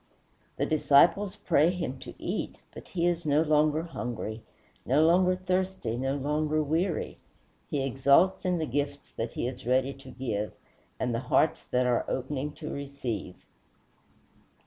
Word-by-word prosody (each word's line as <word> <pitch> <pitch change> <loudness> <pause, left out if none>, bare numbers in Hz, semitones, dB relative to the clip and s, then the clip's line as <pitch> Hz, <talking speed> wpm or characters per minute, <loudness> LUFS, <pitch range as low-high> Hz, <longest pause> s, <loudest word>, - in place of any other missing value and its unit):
The - - +1
disciples 165 +6 +4
pray 170 -6 +3
him 170 -8 -3
to - - -10
eat, - - -3 0.2
but - - -10
he 170 -2 -1
is 175 -1 +1
no 150 +1 +3
longer 155 0 +3
hungry, 120 -8 -5 0.4
no 145 +5 +3
longer 180 +2 +4
thirsty, 185 -8 -1
no 135 +3 -1
longer 150 +2 0
weary; 165 +4 -1 0.5
he 140 -2 -1
exults 140 +8 +3
in 180 -2 +1
the 160 - -1
gifts 140 +1 -3
that 115 +1 -4
he - - -2
is 125 -2 -7
ready 130 +2 +2
to 135 0 -13
give, 115 -5 -3 0.5
and 125 -2 0
the 115 - 0
hearts 160 - +2
that 125 0 +1
are 125 -1 +1
opening 135 +2 -2
to 155 - -6
receive. 130 -10 -5
145 Hz, 150 wpm, -28 LUFS, 130-165 Hz, 0.5 s, disciples